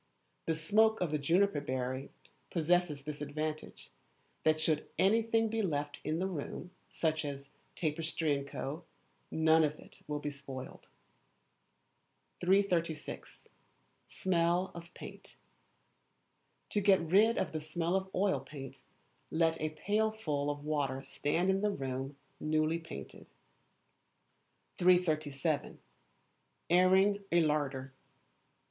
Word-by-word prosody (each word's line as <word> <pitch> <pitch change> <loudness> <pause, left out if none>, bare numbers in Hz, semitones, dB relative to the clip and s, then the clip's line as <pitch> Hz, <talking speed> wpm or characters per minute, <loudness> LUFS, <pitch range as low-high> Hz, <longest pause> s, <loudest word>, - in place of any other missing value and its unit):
The 165 - +2
smoke 215 +7 +3
of 175 -4 0
the 150 - 0
juniper 170 +2 +3
berry 130 +1 -3 0.4
possesses 170 -3 +1
this 150 0 -6
advantage, 155 +1 -4 0.5
that 155 0 +3
should 155 -1 0
anything 225 +2 +3
be 225 +1 -1
left 145 -6 -2
in 155 +1 -1
the 185 - 0
room, 180 0 -5 0.2
such 160 -1 0
as; 140 -1 -6 0.3
tapestry, 155 -2 0
&c., 140 - -13 0.8
none 160 0 +4
of 150 0 0
it - - -15
will 150 0 -2
be 145 0 -3
spoiled. 135 -2 -9 1.6
336. 175 -4 0 0.6
Smell 175 0 +1
of 170 0 -10
Paint. - - -10 1.4
To 205 - +2
get 195 -1 +6
rid 200 +8 +4
of - - 0
the 155 - -2
smell 165 +3 -1
of 190 0 -1
oil 190 -6 +2
paint, 135 0 -9 0.5
let 165 0 +1
a 155 - 0
pailful 205 -7 0
of 145 0 -4
water 140 -3 -1
stand 170 +8 0
in 190 0 +1
the 210 - +2
room 135 -5 -4 0.2
newly 155 +1 +1
painted. 165 - -9 1.5
337. 155 -5 +2 0.9
Airing 190 +3 +5
a 170 0 +5
Larder. 140 -3 -1
160 Hz, 115 wpm, -33 LUFS, 145-185 Hz, 1.6 s, get